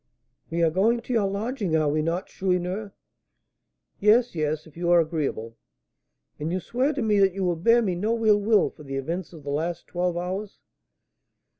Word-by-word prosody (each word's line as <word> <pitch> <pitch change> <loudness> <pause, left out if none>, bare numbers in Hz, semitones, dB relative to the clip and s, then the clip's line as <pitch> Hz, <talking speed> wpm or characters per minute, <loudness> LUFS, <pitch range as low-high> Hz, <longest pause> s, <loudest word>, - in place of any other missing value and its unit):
"We 170 +1 0
are 165 - +3
going 225 +7 +2
to 250 - -5
your 215 -4 +2
lodging, 200 -2 -2
are 155 -1 +2
we 150 +1 +1
not, 165 +4 -1
Chourineur?" 185 +2 -2 1.1
"Yes, 225 +4 +4
yes, 155 -1 -2
if 160 - -17
you 170 0 -2
are 175 0 +6
agreeable." 150 -9 -2 0.8
"And 155 +3 -2
you 185 - 0
swear 255 - 0
to 275 -4 -2
me 210 -2 +2
that 195 -2 +3
you 185 -3 0
bear 230 +8 +4
me 190 -4 0
no 225 +5 -1
ill 210 -1 +5
will 215 0 +3
for - - -16
the 135 -2 -6
events 165 +6 -4
of 160 -4 -12
the 140 - -4
last 165 +4 -2
twelve 175 -1 -2
hours?" 190 +4 -4
180 Hz, 185 wpm, -25 LUFS, 160-210 Hz, 1.1 s, are